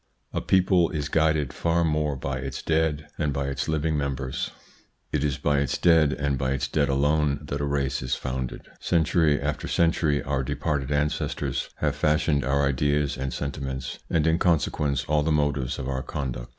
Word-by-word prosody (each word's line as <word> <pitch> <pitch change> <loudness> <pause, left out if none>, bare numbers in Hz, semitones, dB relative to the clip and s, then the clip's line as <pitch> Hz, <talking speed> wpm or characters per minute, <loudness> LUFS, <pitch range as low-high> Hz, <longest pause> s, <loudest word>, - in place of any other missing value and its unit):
A - - -1
people 90 -2 +3
is 75 -2 -3
guided 80 -3 +2
far 85 0 +1
more 75 -2 +1
by 65 +1 -3
its 65 +1 -5
dead 80 -2 +1
than 75 -2 +1
by 70 0 -2
its 70 -1 -3
living 80 0 0
members. 70 -2 -2 0.6
It 75 -2 0
is 70 -2 0
by 75 0 +1
its 70 -3 0
dead, 80 -4 +5
and 70 -3 -1
by 65 0 0
its 70 - -1
dead 70 -2 +1
alone, 75 +1 +2
that 70 0 -4
a - - 0
race 70 -2 -1
is 65 0 -1
founded. 65 0 -4
Century 80 -3 +2
after 75 +1 -2
century 80 -3 +2
our 65 -1 -1
departed 70 +1 -2
ancestors 75 +1 -1
have 75 -2 -1
fashioned 75 -1 +2
our 70 +3 +2
ideas 70 +1 +1
and 65 +1 -3
sentiments, 65 -3 -4
and 80 -2 +2
in 80 +1 +3
consequence 75 -4 +1
all 75 0 +2
the 80 +2 0
motives 75 -4 0
of 65 - -4
our 65 -1 -2
conduct. 65 -4 -4
70 Hz, 180 wpm, -26 LUFS, 70-75 Hz, 0.6 s, dead